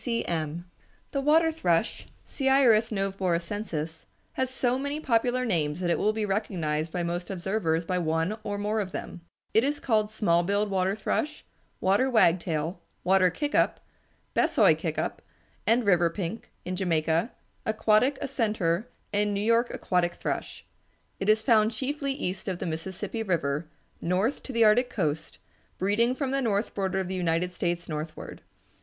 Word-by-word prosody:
C. 230 -2 0
C. - - -6
M. 165 0 -3 0.5
The 275 - -1
water 320 +3 +4
thrush 180 - 0 0.2
(Seiurus 265 -5 +4
noveboracensis) 185 -4 -2 0.3
has 260 -1 -1
so 255 0 0
many 285 +2 -2
popular 250 -2 +1
names 160 -7 0
that 175 -2 0
it - - +1
will 210 - +3
be 215 0 -2
recognized 165 -6 -1
by 175 0 -2
most 175 +1 -3
observers 175 -3 -1
by 180 +1 0
one 165 +4 0
or 205 0 -3
more 210 +2 -1
of 185 -2 -6
them. 175 - -6 0.3
It 220 - +5
is 290 +2 0
called 215 -4 +1
small 190 -6 +2
billed 200 +3 0
water 190 0 +1
thrush, 300 +7 -2 0.3
water 200 +8 +3
wagtail, 170 - +2 0.2
water 185 0 +4
kick 290 - -3
up, - - +2 0.5
Besoy - - +4
kick - - -4
up, - - -2 0.5
and 235 +2 +4
river 175 -4 +4
pink 190 +5 -5 0.2
(Jamaica), 170 +1 0 0.4
aquatic 220 +5 +3
accentor, 215 -8 0 0.3
and 205 0 +1
New - - 0
York 230 +1 +3
aquatic 175 -2 0
thrush. - - -4 0.5
It 195 - -1
is 215 +1 +4
found 220 -4 +4
chiefly 275 +4 -2
east 190 -9 -4
of 185 -2 -1
the - - -4
Mississippi 180 +7 -4
River, 160 -6 -1 0.3
north 190 +10 0
to - - -7
the 230 -2 +3
Arctic 245 +4 +4
coast, 155 -8 -2 0.4
breeding 225 +6 +2
from 270 -1 -2
the 275 0 +1
north 215 -3 0
border 190 -1 -1
of 190 - -2
the 190 - -4
United 175 0 0
States 175 -1 -2
northward. 155 0 -6
200 Hz, 160 wpm, -27 LUFS, 175-230 Hz, 0.5 s, It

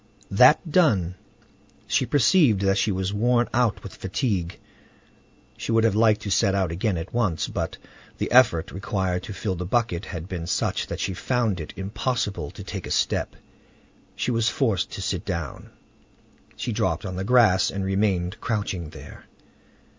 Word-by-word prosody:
That 130 - +5
done, 105 - +3 0.7
she - - +1
perceived 145 - +4
that 95 0 +2
she 110 - +1
was 95 +1 -2
worn 120 +3 +2
out 115 -5 +1
with 100 - -8
fatigue. 95 -3 -2 1.0
She - - -4
would 115 0 +3
have 115 -3 +3
liked 110 0 +3
to 100 - -4
set 95 +1 +3
out 95 -4 0
again 95 +2 -1
at 80 - -6
once, 105 -9 0
but - - -4 0.4
the - - -3
effort 115 -10 +4
required 95 -1 -2
to 105 - -7
fill 95 0 -2
the 90 0 -4
bucket 110 -4 0
had 85 0 -6
been 85 -3 -5
such - - -1
that - - -5
she 95 - -1
found 110 0 0
it 80 - -6
impossible 100 - -2
to - - -10
take - - -6
a - - -7
step. - - 0 0.8
She - - -1
was 115 -1 +2
forced 115 - 0
to - - -5
sit - - -2
down. 85 -5 -5 0.9
She 120 - -3
dropped 110 -1 -1
on 95 -1 -4
the 95 - -3
grass, 100 -5 +4
and 100 0 -3
remained 95 -1 0
crouching 100 -7 -2
there. - - -12
100 Hz, 170 wpm, -24 LUFS, 90-115 Hz, 1.0 s, That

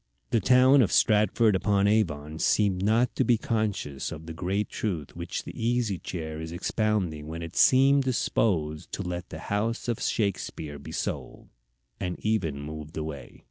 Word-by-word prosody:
The 115 - +3
town 130 +5 +6
of 105 - +2
Stratford 105 0 +4
upon 100 +1 +2
Avon 80 -8 0
seemed 100 -3 +2
not 115 +4 +2
to - - +2
be 120 -1 +3
conscious 105 - -2
of 80 - -8
the 80 - -7
great 95 +6 -1
truth 85 -10 -4
which - - -4
the - - -8
Easy 115 -5 0
Chair 80 -3 -5
is 80 0 -6
expounding 90 -4 -1
when 80 +1 -5
it 85 +1 -8
seemed 135 +2 +5
disposed 90 - 0
to - - -3
let 90 0 -5
the - - -7 0.2
house 115 +4 -1
of 120 -2 -1
Shakespeare 85 -8 -2
be - - -9
sold, - - -5 0.5
and 90 -1 -3
even 95 -10 0
moved 75 +1 -8
away. 75 -3 -6
100 Hz, 165 wpm, -27 LUFS, 80-110 Hz, 0.5 s, town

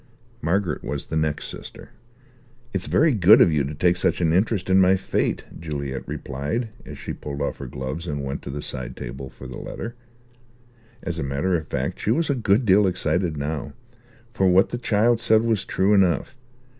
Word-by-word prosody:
Margaret 90 -2 0
was 70 -1 -4
the 80 - -5
next 80 -1 0
sister. - - -10 0.8
"It's 95 -2 -2
very 155 +1 +4
good 105 0 +7
of 90 - +6
you 75 -2 +2
to 75 +2 -5
take 90 +3 +2
such - - +1
an 80 -2 +2
interest 100 +1 +1
in 95 0 +5
my 95 +1 +5
fate," 95 - -1 0.2
Juliet 70 -4 -4
replied, 75 - -3 0.2
as - - -8
she - - -5
pulled 70 -1 -6
off 70 - -2
her 70 - -6
gloves 65 +7 -5
and 70 -2 -3
went 70 +1 -4
to - - -8
the 75 +1 -5
side 65 -1 -6
table 65 +2 -6
for 65 - -13
the 65 -2 -7
letter. 120 - -6 1.1
As 85 -1 -3
a - - -1
matter 70 +7 0
of 80 -2 -3
fact - - -3
she - - -2
was 145 +6 +2
a - - +3
good 115 -1 +2
deal 100 0 +5
excited 85 -2 0
now; 75 +1 -3 0.6
for 95 -5 +2
what 95 +1 +5
the 120 - -4
child 115 0 +2
said 110 -1 +3
was 110 -4 0
true 95 +2 +2
enough. 95 +6 +2
90 Hz, 195 wpm, -24 LUFS, 70-100 Hz, 1.1 s, good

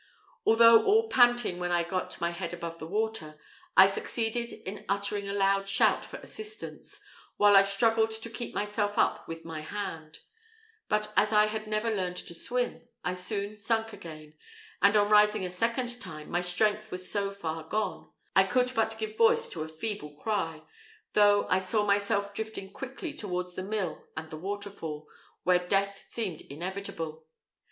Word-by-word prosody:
Although 230 0 +7
all 445 +2 +3
panting 240 - +4
when 175 0 -2
I 175 -1 +3
got 185 +2 -3
my 170 0 0
head 170 0 -5
above 170 -1 -6
the 160 - -6
water, 205 -6 -2 0.4
I 190 - +11
succeeded 225 +4 -1
in 210 -2 -8
uttering 200 0 -1
a - - -2
loud 195 0 +2
shout 195 - +4
for - - -8
assistance, 430 0 -6 0.4
while 205 0 +6
I 195 - +10
struggled 220 +3 +3
to 220 +1 -6
keep 240 0 -5
myself 205 0 -1
up - - +1
with 165 0 -7
my 160 -1 -5
hand; 160 -3 -6 0.7
but 210 0 0
as 210 - +4
I 210 0 +6
had 215 0 -4
never 215 +2 0
learned 180 -2 -2
to 170 - -3
swim, 240 -1 -2 0.2
I 180 - -1
soon 200 +3 -3
sunk 225 +1 0
again, 155 -6 -10 0.5
and 200 +2 +6
on 205 0 +4
rising 210 -1 +5
a 180 - -4
second 235 +5 -1
time, 155 -1 -8
my 175 - +1
strength 210 +4 +1
was 185 0 -5
so 200 -1 0
far 165 -5 -4
gone, 210 +7 -3 0.3
I 190 - +7
could 250 +5 +2
but 225 0 +1
give 220 -1 -4
voice 230 0 +4
to 165 - -5
a 155 - -3
feeble 160 -2 -4
cry, 165 -4 -2 0.5
though 205 -1 +5
I 185 - +3
saw 210 +3 0
myself 200 0 +1
drifting 215 -2 -5
quickly 270 +4 -6
towards 180 -8 -4
the 185 - -5
mill 195 -3 -3
and 160 0 -6
the 155 - -6
waterfall, 190 -5 -5 0.4
where 180 0 +4
death 195 +2 -1
seemed 200 -9 -3
inevitable. 165 -1 -5
200 Hz, 170 wpm, -29 LUFS, 180-220 Hz, 0.7 s, I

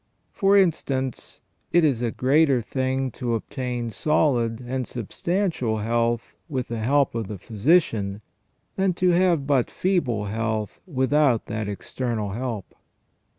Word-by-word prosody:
For 200 0 +3
instance, 135 -8 0 0.3
it 175 - +4
is 135 -7 +2
a 120 - +1
greater 135 +3 +3
thing 130 +2 -1
to 120 0 -2
obtain 120 0 -4
solid 120 -4 +1
and 125 0 -3
substantial 130 - -1
health 115 +2 0 0.2
with 130 -4 -3
the 115 -1 -3
help 140 +5 +2
of 115 -3 -3
the 105 - -6
physician 110 - +1 0.5
than 190 -1 +2
to 180 +1 +2
have 175 -4 +3
but 135 -4 +2
feeble 130 - 0
health 110 0 -2
without 135 -4 +2
that 110 -1 -3
external 110 0 -3
help. 115 -2 -4
125 Hz, 130 wpm, -24 LUFS, 115-150 Hz, 0.5 s, it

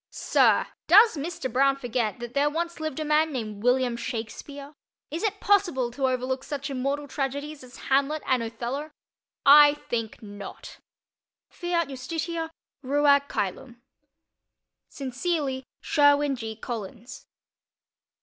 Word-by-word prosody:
Sir, - - +3 0.2
does 420 +3 +7
Mr. 320 0 -4
Broun 275 +1 +4
forget 245 -5 -2
that 240 0 -7
there 285 +2 +2
once 335 +2 -3
lived 310 -2 -4
a 310 - -2
man 305 +1 +2
named 215 -6 -5
William 245 0 +2
Shakespeare? 255 +4 -6 0.4
Is 320 - -3
it 420 -2 -1
possible 350 -12 +2
to 265 +2 0
overlook 260 +1 -1
such 280 -1 -5
immortal 275 +2 -2
tragedies 285 +1 -4
as 250 -1 -13
Hamlet 280 +3 +1
and 255 -2 +2
Othello? 240 +6 -4 0.6
I 290 +1 +8
think 230 -5 -5
not. 205 -1 -10 0.7
Fiat 350 -2 -1
justitia, 320 +5 -4 0.3
ruat 280 +1 +3
cœlum. 235 +5 -3 1.1
Sincerely, 270 0 -2 0.2
SHERWIN 285 -1 +3
G. 225 -3 -6
COLLINS. 225 0 -7
275 Hz, 120 wpm, -26 LUFS, 245-300 Hz, 1.1 s, I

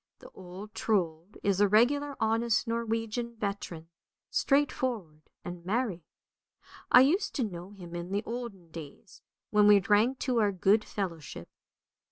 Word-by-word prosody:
The - - -14
old 190 +3 -10
Trold 180 -4 -1
is 200 -1 +2
a 205 - +6
regular 280 +7 +3
honest 225 +1 +1
Norwegian 230 0 -2
veteran, 200 -6 -5 0.4
straightforward 245 - 0 0.2
and 175 -1 -7
merry. 205 -2 -1 0.9
I 250 - +9
used 335 +10 +2
to 265 - 0
know 180 -4 -6
him 180 -4 -11
in 175 +2 -5
the 200 +2 -1
olden 220 -8 -7
days, 160 +2 -11 0.3
when 210 -1 +5
we 205 -1 +8
drank 210 +7 +2
to 250 -3 +1
our 210 -2 +3
good 200 +3 +3
fellowship. 170 -9 -5
210 Hz, 140 wpm, -29 LUFS, 180-235 Hz, 0.9 s, I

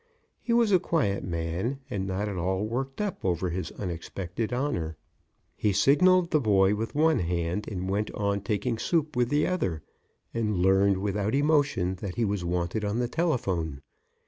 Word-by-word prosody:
He 235 - -3
was 235 -2 +4
a 185 - +6
quiet 130 - 0
man 85 +9 -2
and 95 -1 -3
not 95 +2 -2
at 100 - -4
all 95 +3 -1
worked 130 +4 -3
up 210 -2 -3
over 90 -1 0
his 90 +2 -3
unexpected 90 +4 -4
honor. 105 - -2 0.6
He 105 - +1
signaled 170 - +4
the 155 - +4
boy 100 -5 +4
with 110 +4 -3
one 160 +1 +3
hand 85 +3 -1
and 95 -3 -4
went 105 +2 -1
on 100 -1 -1
taking 105 +3 -1
soup 155 -1 0
with 120 -1 +2
the 150 +2 +2
other, 95 - -1 0.5
and 105 -4 0
learned, 95 +2 +4
without 105 +3 -1
emotion, 145 - +2
that 95 -4 -4
he 120 - +1
was 100 -3 -1
wanted 90 +4 -1
on 105 +2 -1
the 120 0 0
telephone. 95 - -1
105 Hz, 170 wpm, -27 LUFS, 95-135 Hz, 0.6 s, a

